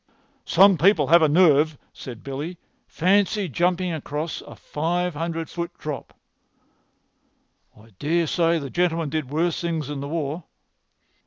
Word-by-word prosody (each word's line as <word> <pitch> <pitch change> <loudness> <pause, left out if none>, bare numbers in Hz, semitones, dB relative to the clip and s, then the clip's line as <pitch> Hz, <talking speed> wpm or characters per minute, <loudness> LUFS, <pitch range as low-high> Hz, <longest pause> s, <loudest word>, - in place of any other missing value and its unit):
"Some 195 -1 +5
people 175 -3 +4
have 170 +1 +7
a 155 - +4
nerve," 155 -2 +4 0.2
said 120 -3 -9
Billy. 145 +6 -5 0.3
"Fancy 200 +3 +1
jumping 175 +3 0
across 150 +1 -4
a - - -12
five 175 +3 -2
hundred 165 +1 -3
foot 170 0 -6
drop!" 150 -2 -6 1.6
"I 110 +2 -18
dare 165 +3 +1
say 165 +1 +2
the 140 -4 -6
gentleman 170 -3 0
did 155 -3 -3
worse 165 +3 0
things 160 -4 -2
in 145 - -4
the 140 - -5
war." 155 +1 -3
165 Hz, 140 wpm, -23 LUFS, 150-175 Hz, 1.6 s, have